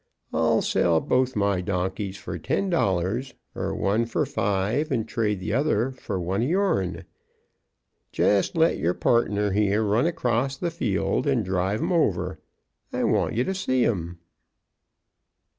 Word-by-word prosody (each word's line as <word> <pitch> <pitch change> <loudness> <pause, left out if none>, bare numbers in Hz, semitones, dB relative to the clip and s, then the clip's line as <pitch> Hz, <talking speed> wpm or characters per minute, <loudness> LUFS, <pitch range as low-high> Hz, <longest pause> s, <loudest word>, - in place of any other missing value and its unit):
I'll - - +2
sell 85 -2 +2
both 130 +8 +1
my 100 -3 +1
donkeys 95 +1 -2
for 90 -1 -6
ten 190 - -1
dollars, 105 - 0 0.2
er - - -3
one 110 +4 +1
for 115 - 0
five 105 +10 -1
and 115 -5 0
trade 105 -4 -1
the 95 - -3
other 130 -2 +1
for 105 -7 -5
one 95 +4 -1
of 125 - 0
your'n. 100 - 0 1.1
Jest 100 - +2
let 165 +1 +3
your 85 +2 0
partner 105 -4 +1
here 105 +2 +2
run 110 +8 +2
across 135 -4 0
the 170 +3 -2
field 120 - -1
and 130 -7 +1
drive 95 +3 -1
'em - - -1
over. 90 - 0 0.5
I - - -1
want - - +1
ye 120 - +2
to 190 - -2
see 130 -10 +1
'em." 85 -6 -2
105 Hz, 150 wpm, -25 LUFS, 95-130 Hz, 1.1 s, let